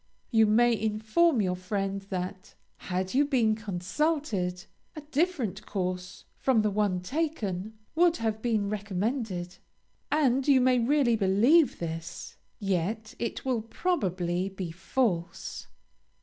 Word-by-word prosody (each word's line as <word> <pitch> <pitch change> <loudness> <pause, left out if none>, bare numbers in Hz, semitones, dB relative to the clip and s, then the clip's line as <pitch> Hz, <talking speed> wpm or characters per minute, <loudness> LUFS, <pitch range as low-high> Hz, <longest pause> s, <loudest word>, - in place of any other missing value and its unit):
You 220 -2 +5
may 235 +3 +4
inform 220 +6 +2
your 180 -1 0
friend 195 +1 -2
that, 185 +1 -5 0.2
"had 185 0 -3
you 275 +3 +4
been 250 -7 +2
consulted, 200 - -1 0.3
a 305 - -6
different 285 - -1
course 185 -1 -4
from 245 -5 +3
the 210 - +1
one 200 -3 +1
taken 220 - -3 0.2
would 340 +1 +4
have 220 -1 -2
been 220 -4 +1
recommended," 205 -2 -3 0.5
and 270 -3 +2
you 275 -2 +6
may 255 0 +4
really 250 -1 +3
believe 225 - +4
this, 165 0 -6 0.2
yet 200 +3 -2
it 235 - -3
will 250 -4 +1
probably 190 - -1
be 190 -3 -5
false. 175 -1 -2
215 Hz, 120 wpm, -28 LUFS, 185-255 Hz, 0.5 s, you